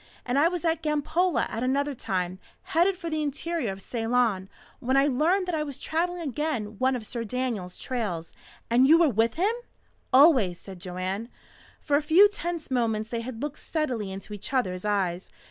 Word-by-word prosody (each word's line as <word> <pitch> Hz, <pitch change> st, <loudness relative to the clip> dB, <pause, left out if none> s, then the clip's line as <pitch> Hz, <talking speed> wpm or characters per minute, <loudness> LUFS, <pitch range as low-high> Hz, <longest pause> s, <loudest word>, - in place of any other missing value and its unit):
And 250 Hz, +3 st, +1 dB
I 310 Hz, -, +5 dB
was 345 Hz, -1 st, -3 dB
at 325 Hz, 0 st, +1 dB
Gampola 315 Hz, +4 st, +1 dB
at 225 Hz, -, -5 dB
another 280 Hz, +3 st, 0 dB
time, 185 Hz, -6 st, -3 dB, 0.3 s
headed 360 Hz, +4 st, +3 dB
for 345 Hz, -2 st, -6 dB
the 310 Hz, 0 st, 0 dB
interior 300 Hz, -3 st, -2 dB
of 195 Hz, 0 st, -8 dB
Ceylon, 225 Hz, -5 st, 0 dB, 0.3 s
when 260 Hz, +2 st, +1 dB
I 275 Hz, -, +5 dB
learned 315 Hz, +8 st, +2 dB
that 360 Hz, -, -3 dB
I 315 Hz, -, 0 dB
was 285 Hz, -3 st, -5 dB
travelling 345 Hz, +2 st, -2 dB
again 250 Hz, -8 st, -3 dB
one 260 Hz, 0 st, +2 dB
of 230 Hz, -3 st, -5 dB
Sir 235 Hz, +1 st, -4 dB
Daniel's 230 Hz, -6 st, -3 dB
trails. 200 Hz, -10 st, -3 dB, 0.3 s
And 245 Hz, +3 st, +4 dB
you 320 Hz, +3 st, +7 dB
were 335 Hz, -3 st, +5 dB
with 225 Hz, -1 st, +1 dB
him!" 390 Hz, +7 st, +2 dB, 0.6 s
"Always," 255 Hz, -, +5 dB
said 190 Hz, -2 st, -10 dB
Joanne. 185 Hz, +5 st, -4 dB, 0.5 s
For 285 Hz, -1 st, +2 dB
a -, -, +1 dB
few 330 Hz, +7 st, +7 dB
tense 345 Hz, -7 st, -5 dB
moments 225 Hz, -3 st, 0 dB
they 235 Hz, -1 st, -2 dB
had 240 Hz, +1 st, -6 dB
looked 295 Hz, 0 st, -4 dB
steadily 250 Hz, -, -2 dB
into 195 Hz, +2 st, -8 dB
each 205 Hz, +4 st, -6 dB
other's 185 Hz, -8 st, 0 dB
eyes. 190 Hz, -3 st, -1 dB
255 Hz, 185 wpm, -27 LUFS, 210-310 Hz, 0.6 s, you